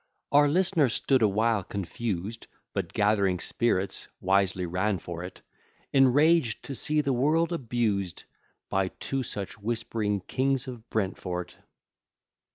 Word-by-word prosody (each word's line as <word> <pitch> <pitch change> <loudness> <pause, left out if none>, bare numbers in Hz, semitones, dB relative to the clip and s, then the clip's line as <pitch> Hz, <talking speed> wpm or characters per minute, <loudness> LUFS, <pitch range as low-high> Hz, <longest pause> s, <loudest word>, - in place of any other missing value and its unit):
Our 145 +1 +6
listener 170 -3 +3
stood 130 +3 +2
awhile 110 0 +2
confused, 100 +2 -4 0.3
But - - -2
gathering 100 -3 +2
spirits, 100 -1 -1
wisely 95 -1 +2
ran 95 +4 0
for't, 90 +1 -8 0.5
Enraged 135 0 +4
to 140 - -6
see 150 +3 +2
the 140 -2 0
world 160 +7 +2
abused, 110 - -1 0.4
By 95 -1 +1
two 135 +7 -3
such 105 -3 -5
whispering 110 -2 -1
kings 135 +6 0
of 120 -3 -9
Brentford. 90 -4 -3
110 Hz, 115 wpm, -28 LUFS, 95-135 Hz, 0.5 s, Our